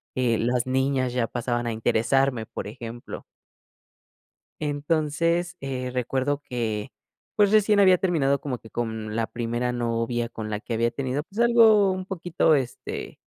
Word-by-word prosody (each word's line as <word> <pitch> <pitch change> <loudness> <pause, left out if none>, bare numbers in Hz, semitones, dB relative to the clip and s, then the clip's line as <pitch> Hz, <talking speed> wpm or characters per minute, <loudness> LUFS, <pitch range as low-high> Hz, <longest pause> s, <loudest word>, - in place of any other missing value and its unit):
eh, 120 -3 +2
las 120 +1 0
niñas 130 -1 +1
ya 125 -2 0
pasaban 120 0 -2
a 115 - 0
interesarme, 120 +2 +1
por - - -6
ejemplo. 115 +2 -8 1.4
Entonces, 155 +3 0
eh, 130 -2 -4
recuerdo 130 +3 -1
que, 110 -4 -3 0.4
pues 205 -1 +4
recién 215 -1 +4
había 185 -2 +6
terminado 150 -7 +1
como 130 -4 -4
que 110 - -14
con 110 -2 -4
la 115 - +1
primera 120 +1 -2
novia 120 0 -1
con 110 -2 -6
la 105 - -2
que 115 +1 -4
había 115 +1 +1
tenido, 135 +2 -2
pues 200 +6 -10
algo 225 -4 +6
un 185 0 -4
poquito, 175 -3 +1
este, 130 -4 -3
130 Hz, 150 wpm, -25 LUFS, 115-155 Hz, 1.4 s, había